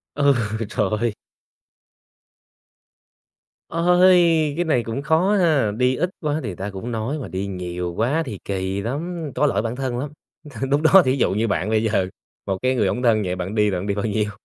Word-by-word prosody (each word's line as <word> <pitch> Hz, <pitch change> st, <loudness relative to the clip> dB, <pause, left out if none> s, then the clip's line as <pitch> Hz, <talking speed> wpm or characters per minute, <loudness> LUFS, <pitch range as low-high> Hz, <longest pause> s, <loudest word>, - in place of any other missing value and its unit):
Ừ, 145 Hz, -1 st, +4 dB, 0.3 s
trời 110 Hz, +1 st, -1 dB, 2.6 s
Ôi, 170 Hz, -2 st, +4 dB
cái 175 Hz, -, 0 dB
này 150 Hz, -7 st, +1 dB
cũng 115 Hz, +4 st, -4 dB
khó 165 Hz, +7 st, +2 dB
ha! 155 Hz, -, +3 dB
Đi 125 Hz, +2 st, +2 dB
ít 180 Hz, +6 st, -1 dB
quá 150 Hz, -3 st, -1 dB
thì 115 Hz, -, -4 dB
người 90 Hz, -, -6 dB
ta 95 Hz, +3 st, -5 dB
cũng 100 Hz, +5 st, -6 dB
nói 115 Hz, +7 st, -2 dB
mà 135 Hz, -, -6 dB
đi 95 Hz, +1 st, -3 dB
nhiều 90 Hz, -2 st, -4 dB
quá 135 Hz, +9 st, +1 dB
thì 105 Hz, -6 st, -6 dB
kỳ 95 Hz, 0 st, -2 dB
lắm, 155 Hz, -, -4 dB
có 150 Hz, -, +2 dB
lỗi 140 Hz, -, 0 dB
bản 115 Hz, +1 st, -3 dB
thân 130 Hz, -2 st, -3 dB
lắm. 145 Hz, +2 st, -4 dB, 0.6 s
Lúc 140 Hz, +1 st, +3 dB
đó 185 Hz, +4 st, +7 dB
thí 130 Hz, +1 st, +1 dB
dụ 130 Hz, -, +2 dB
như 110 Hz, +3 st, 0 dB
bạn 100 Hz, 0 st, -1 dB
bây 110 Hz, 0 st, +2 dB
giờ, 105 Hz, -4 st, +1 dB, 0.4 s
một 95 Hz, -1 st, -1 dB
cái 130 Hz, 0 st, +2 dB
người 120 Hz, -, +1 dB
hổng 125 Hz, -, -2 dB
thân 115 Hz, -3 st, +3 dB
vậy 90 Hz, 0 st, -2 dB
bạn 95 Hz, +3 st, -4 dB
đi 105 Hz, -1 st, +3 dB
là 95 Hz, -, -2 dB
bạn 95 Hz, -, -5 dB
đi 100 Hz, -, 0 dB
bao 100 Hz, -, -3 dB
nhiêu? 105 Hz, -1 st, 0 dB
120 Hz, 205 wpm, -22 LUFS, 100-150 Hz, 2.6 s, đó